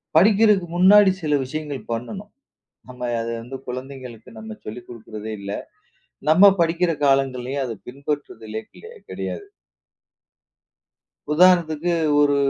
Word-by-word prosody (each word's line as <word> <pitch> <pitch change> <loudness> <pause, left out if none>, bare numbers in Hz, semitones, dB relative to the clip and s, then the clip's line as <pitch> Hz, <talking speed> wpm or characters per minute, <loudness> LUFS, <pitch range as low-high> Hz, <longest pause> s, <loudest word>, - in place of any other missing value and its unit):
படிக்கிறதுக்கு 205 +1 +5
முன்னாடி 195 +2 +7
சில 150 -2 +1
விஷயங்கள் 145 0 -5
பண்ணணும். 195 - -5 0.6
நாம 125 -1 -6
அதை 115 0 -3
வந்து 125 +4 -8
குழந்தைகளுக்கு 125 -2 -8
நம்ம 110 0 -8
சொல்லிக் 120 +3 -8
கொடுக்கிறதே 110 -2 -8
இல்ல. 100 0 -6 0.8
நம்ம 195 +5 +7
படிக்கிற 170 +1 +2
காலங்கள்லயும் 135 -1 +1
அதை 115 -2 -5
பின்பற்றுதலே 125 -5 -5
கிலே 445 +1 -13 0.2
கெடையாது. 405 - -5 1.9
உதாரணத்துக்கு 170 -1 +4 0.3
ஒரு 145 -1 +4
140 Hz, 105 wpm, -22 LUFS, 120-175 Hz, 1.9 s, முன்னாடி